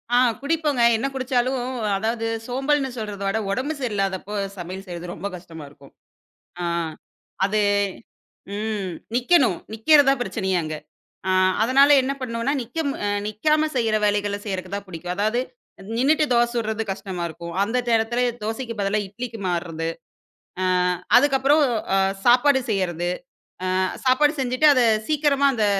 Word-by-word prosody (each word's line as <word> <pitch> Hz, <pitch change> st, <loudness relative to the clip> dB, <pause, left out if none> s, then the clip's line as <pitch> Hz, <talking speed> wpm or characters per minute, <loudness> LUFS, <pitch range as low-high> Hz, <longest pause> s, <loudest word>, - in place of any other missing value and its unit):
ஆ -, -, +6 dB, 0.2 s
குடிப்போங்க. 295 Hz, -4 st, 0 dB, 0.2 s
என்ன 270 Hz, -, -1 dB
குடிச்சாலும், 255 Hz, -1 st, 0 dB, 0.4 s
அதாவது 225 Hz, +2 st, -2 dB, 0.2 s
சோம்பல்ன்னு 270 Hz, +2 st, 0 dB
சொல்றத 205 Hz, -2 st, -5 dB
விட, 210 Hz, +3 st, 0 dB
ஒடம்பு 270 Hz, +8 st, -1 dB
சரியில்லாதப்போ 205 Hz, -4 st, -2 dB, 0.2 s
சமையல் 185 Hz, +3 st, -7 dB
செய்றது 175 Hz, 0 st, -6 dB
ரொம்ப 200 Hz, -, -5 dB
கஷ்டமா 165 Hz, -3 st, -10 dB
இருக்கும். 140 Hz, -1 st, -18 dB, 0.7 s
அ. -, -, -1 dB, 0.8 s
அது 210 Hz, +1 st, +1 dB, 0.9 s
ம், 210 Hz, -4 st, -3 dB, 0.2 s
நிக்கணும். 250 Hz, -, +3 dB, 0.2 s
நிக்கிறது 285 Hz, +5 st, +5 dB
தான் 275 Hz, -2 st, +2 dB
பிரச்சனையே 190 Hz, -2 st, -1 dB
அங்க. 155 Hz, 0 st, -4 dB, 0.5 s
அ -, -, +3 dB, 0.3 s
அதனால 275 Hz, +4 st, +5 dB
என்ன 270 Hz, +2 st, -1 dB
பண்ணுவோம்னா, 230 Hz, +3 st, -1 dB
நிக்கம் 280 Hz, +5 st, -3 dB
அ -, -, +1 dB, 0.2 s
நிக்காம 305 Hz, +9 st, +1 dB
செய்ற 225 Hz, -3 st, +1 dB
வேலைகளை 205 Hz, 0 st, 0 dB
செய்றக்கு 185 Hz, -2 st, -4 dB
தான் 200 Hz, 0 st, -5 dB
புடிக்கும். 175 Hz, 0 st, -5 dB
அதாவது, 215 Hz, +5 st, +1 dB, 0.6 s
நின்னுட்டு 300 Hz, +4 st, +3 dB
தோசை 235 Hz, 0 st, +3 dB
சுடுறது 220 Hz, -1 st, -1 dB
கஷ்டமா 185 Hz, -2 st, -5 dB
இருக்கும். 170 Hz, +1 st, -8 dB
அந்த 225 Hz, +5 st, -1 dB
நேரத்துல, 230 Hz, +2 st, +2 dB, 0.2 s
தோசைக்கு 230 Hz, +2 st, -3 dB
பதிலா 200 Hz, +2 st, +1 dB
இட்லிக்கு 225 Hz, +2 st, -7 dB
மாறுறது. 165 Hz, -2 st, -2 dB, 0.7 s
அ, -, -, +1 dB, 0.5 s
அதுக்கப்பறம் 285 Hz, +2 st, +4 dB, 0.3 s
அ -, -, +4 dB, 0.3 s
சாப்பாடு 260 Hz, +3 st, +5 dB
செய்யறது. 175 Hz, -4 st, -1 dB, 0.6 s
அ -, -, -1 dB, 0.4 s
சாப்பாடு 290 Hz, +4 st, +4 dB
செஞ்சுட்டு, 255 Hz, +4 st, +2 dB
அதை 250 Hz, -2 st, +4 dB, 0.2 s
சீக்கிரமா 290 Hz, -2 st, +2 dB
அந்த 215 Hz, -2 st, +1 dB
225 Hz, 135 wpm, -23 LUFS, 195-265 Hz, 0.9 s, ஆ